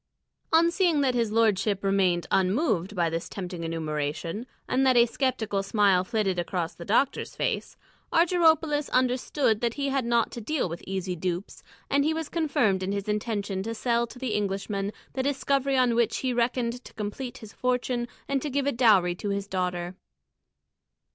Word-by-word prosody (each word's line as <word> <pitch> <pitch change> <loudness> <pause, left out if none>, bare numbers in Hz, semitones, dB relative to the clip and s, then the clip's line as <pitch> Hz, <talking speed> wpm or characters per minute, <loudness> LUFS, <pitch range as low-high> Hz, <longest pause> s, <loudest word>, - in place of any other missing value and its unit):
On 335 +1 +5
seeing 340 -5 +2
that 265 -2 +2
his 230 -3 0
lordship 210 -3 +2
remained 190 -3 +2
unmoved 195 - +1
by 170 -2 +2
this 165 +1 -3
tempting 180 -3 -6
enumeration, 165 - -3 0.2
and 265 - +2
that 260 -2 +4
a 235 - +7
sceptical 230 -5 -1
smile 195 -2 +3
flitted 195 -3 0
across 175 -1 -2
the 170 - -10
doctor's 235 +6 +1
face, - - -2 0.3
Argyropoulos 320 -3 +3
understood 255 -2 +1
that 235 -1 0
he 280 -1 -1
had 270 -1 0
not 235 -1 +1
to 235 - -6
deal 275 +1 -1
with 170 0 -6
easy 190 -1 -2
dupes, 175 +2 -4 0.3
and 280 0 +2
he 315 +2 +1
was 320 -2 -4
confirmed 250 - +1
in 190 +1 -2
his 200 0 -3
intention 210 -2 -2
to 225 +3 -4
sell 235 +1 +1
to 240 - -12
the 250 -3 -3
Englishman 200 0 -2 0.2
the 265 - -1
discovery 275 0 +1
on 250 -2 +3
which 230 -1 +1
he 255 -1 -1
reckoned 240 0 0
to - - -14
complete 220 +4 -5
his 220 -1 -12
fortune 250 -1 -1 0.2
and 275 -1 0
to 295 - -3
give 280 0 0
a 285 - +2
dowry 210 -8 +4
to 200 +3 -5
his 200 0 -2
daughter. 180 -2 -2
225 Hz, 175 wpm, -27 LUFS, 190-260 Hz, 0.3 s, a